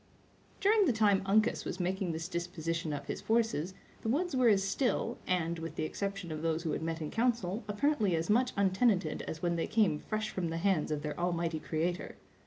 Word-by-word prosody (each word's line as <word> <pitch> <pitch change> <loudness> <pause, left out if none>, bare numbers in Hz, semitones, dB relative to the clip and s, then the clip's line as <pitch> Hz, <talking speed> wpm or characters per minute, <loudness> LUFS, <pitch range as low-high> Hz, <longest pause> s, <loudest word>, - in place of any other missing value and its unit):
During 415 +1 +4
the 270 - +3
time 210 -3 +3
Uncas 215 +2 +3
was 185 - -5
making 185 0 -1
this 160 +1 -4
disposition 170 -2 -3
of 145 -1 -4
his - - -4
forces, 220 -6 0 0.3
the 225 - -2
woods 320 +5 0
were 255 -2 +4
as 200 -3 +5
still, 240 +3 0
and, 170 -2 0
with 165 0 -6
the - - -2
exception 195 +1 -3
of 155 -1 -4
those 165 0 0
who 160 - -1
had - - -2
met 165 0 -3
in 150 - -5
council, 225 -4 0
apparently 210 - +1
as 165 0 -1
much 245 +4 +3
untenanted 190 -3 +2
as 160 +1 -6
when 170 -1 +1
they 165 - -1
came 210 -9 +2
fresh 215 0 -3
from 175 -3 -2
the 165 - -3
hands 185 -3 +1
of 150 -1 -2
their 150 +1 -4
Almighty 170 -2 0
Creator. 170 +3 -2
185 Hz, 205 wpm, -32 LUFS, 165-220 Hz, 0.3 s, as